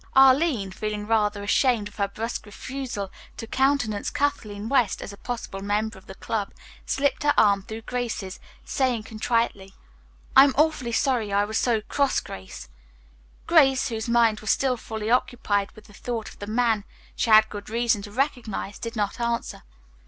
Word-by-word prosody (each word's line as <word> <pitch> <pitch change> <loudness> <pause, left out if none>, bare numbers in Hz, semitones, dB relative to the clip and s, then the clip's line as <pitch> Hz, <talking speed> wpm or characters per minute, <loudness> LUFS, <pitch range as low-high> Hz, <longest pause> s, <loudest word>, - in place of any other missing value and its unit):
Arline, 265 - +5
feeling 210 +1 -4
rather 210 -2 +1
ashamed 225 0 +2
of 205 - -16
her 200 -1 +1
brusque 220 +2 -5
refusal 245 -2 -5 0.3
to - - -5
countenance 260 -4 +1
Kathleen 215 -7 -2
West 245 -6 +2
as 200 - -7
a - - -12
possible 230 -4 -5
member 210 +2 -1
of 190 - -16
the 190 - -9
club, 205 -1 -3 0.3
slipped 285 0 0
her 290 -1 +2
arm 200 -2 +5
through 220 +3 -8
Grace's, 230 -6 -4 0.3
saying 250 -5 0
contritely, 220 -3 -1 0.6
"I 270 - +10
am 275 - 0
awfully 300 -6 +2
sorry 230 -3 +1
I 200 +1 +2
was 220 +1 -1
so 230 -3 +1
cross, 280 +5 +1
Grace." 70 -9 -9 0.8
Grace, 270 -7 +4
whose 225 0 -4
mind 230 -2 +3
was 220 - -6
still 265 -2 +2
fully 220 -1 -4
occupied 205 -5 +1
with 215 - -15
the 205 - -17
thought 230 +1 -4
of - - -16
the 205 - -6
man 225 -1 +1 0.3
she - - -1
had 220 0 +7
good 205 0 -8
reason 230 -1 +1
to 205 0 -9
recognize, 240 -5 -2
did 230 0 -5
not 205 +2 -2
answer. 235 0 -2
220 Hz, 170 wpm, -25 LUFS, 205-250 Hz, 0.8 s, I